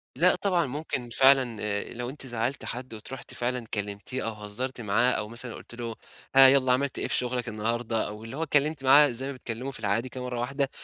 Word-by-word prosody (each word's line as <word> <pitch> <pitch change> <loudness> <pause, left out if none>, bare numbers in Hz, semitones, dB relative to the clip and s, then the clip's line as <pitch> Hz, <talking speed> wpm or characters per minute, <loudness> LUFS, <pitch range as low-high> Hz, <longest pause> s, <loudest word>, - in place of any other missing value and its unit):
لأ - - +4
،طبعًا، 180 -5 +2
ممكن 135 -3 -4
فعلًا 130 -2 +5
آآ 100 -1 -3
لو 120 0 -4
أنتِ 135 -1 -7
زعّلتِ 120 +2 -3
حد 125 0 -6
وت 110 +4 -9
رُحتِ 135 - -9
فعلًا 120 -1 -2
كلّمتيه 105 +5 -3
أو 115 - -3
هزّرتِ 110 +5 -4
معاه 115 +4 +3
أو 105 -3 -2
مثلًا 120 +1 -5
قُلتِ - - -11
له، 115 -2 -5 0.4
هاه 135 0 +10
يالّا 130 -1 +5
عملت 140 +2 0
إيه - - -1
في - - 0
شغلك 125 -1 -1
النهارده؟ 115 +1 -1
أو 105 +1 -8
اللي 120 +5 -8
هو 165 - -1
اتكلّمتِ 150 -1 +1
معاه 140 +2 +7
زي 125 +3 -3
ما 140 - -3
بتتكلّموا 125 +1 -5
في 135 - -8
العاي 105 +1 +1
كده 130 0 -7
مرّة 125 -1 -4
واحدة، 140 +3 -1
125 Hz, 220 wpm, -27 LUFS, 115-135 Hz, 0.4 s, هاه